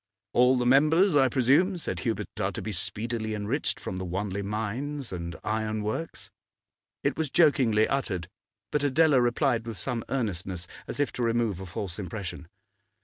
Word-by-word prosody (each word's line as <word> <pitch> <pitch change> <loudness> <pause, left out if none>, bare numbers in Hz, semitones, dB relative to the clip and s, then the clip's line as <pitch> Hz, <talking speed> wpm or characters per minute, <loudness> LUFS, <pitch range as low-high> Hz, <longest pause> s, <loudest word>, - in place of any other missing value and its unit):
'All 125 +1 +5
the 125 - 0
members, 155 +8 +5
I 135 -2 +6
presume,' 140 +9 +3
said 95 - -2
Hubert, - - -1
'are - - 0
to - - -4
be 110 - -3
speedily 110 +3 -2
enriched 105 +8 -2
from 95 - -5
the 95 - -3
Wanley 95 +2 -2
Mines 115 +7 -3
and 85 -1 -5
Iron 110 0 -1
Works?' 130 +10 -4 0.7
It - - 0
was 160 -3 -1
jokingly 130 -9 +4
uttered, 95 -11 -1 0.4
but 150 - +1
Adela 145 -1 +4
replied 120 -1 +1
with 115 -3 -5
some 120 -4 -2
earnestness, 95 -8 -2 0.2
as - - -5
if 145 - +1
to - - -5
remove 115 -5 +1
a 95 - -7
false 90 0 -5
impression. 90 -3 -6
115 Hz, 165 wpm, -28 LUFS, 100-135 Hz, 0.7 s, I